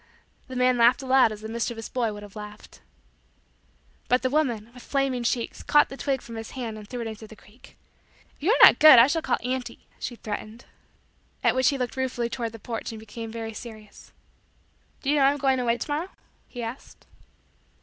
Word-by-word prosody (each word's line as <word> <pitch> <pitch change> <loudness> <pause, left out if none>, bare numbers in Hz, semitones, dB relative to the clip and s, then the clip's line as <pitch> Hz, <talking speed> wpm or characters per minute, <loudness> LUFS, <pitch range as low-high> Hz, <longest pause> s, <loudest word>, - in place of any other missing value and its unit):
The 260 - -8
man 250 -1 +2
laughed 240 +4 +4
aloud 260 -3 +4
as 215 -1 -8
the 220 - -6
mischievous 225 0 -4
boy 235 -4 -1
would 205 0 -9
have 205 0 -13
laughed. 210 0 -11 1.3
But 250 +1 +2
the 255 - 0
woman, 240 -7 0
with 250 - -13
flaming 275 -2 -1
cheeks, 235 0 -2
caught 295 - +4
the 270 - -8
twig 275 -2 -2
from 230 -1 -9
his 225 0 -7
hand 230 -4 -4
and 210 -1 -10
threw 245 -1 -5
it 230 - -4
into 220 0 -8
the 220 - -13
creek. 215 +3 -20 0.6
"If - - -31
you 330 - 0
are - - +4
not - - +9
good, 310 -4 +10
I 235 - +9
shall 320 +4 0
call - - 0
auntie," 250 -1 -4
she 240 - -5
threatened. 215 +1 -7 0.8
At - - +4
which 260 +3 +3
he 280 - -1
looked 250 0 -4
ruefully 250 -2 -2
toward 230 -2 -4
the - - -8
porch 225 +1 -6
and 220 - -8
became 220 +1 -8
very 225 -1 -6
serious. 215 -2 -11 0.9
"Do 275 - +1
you 300 - +2
know - - +3
that 270 - +6
I - - +5
am - - -5
going 265 -2 +1
away 240 -1 +1
to 265 - -5
morrow?" 325 +6 -3 0.4
he 245 -2 -7
asked. 230 +4 -9
240 Hz, 215 wpm, -25 LUFS, 225-260 Hz, 1.3 s, good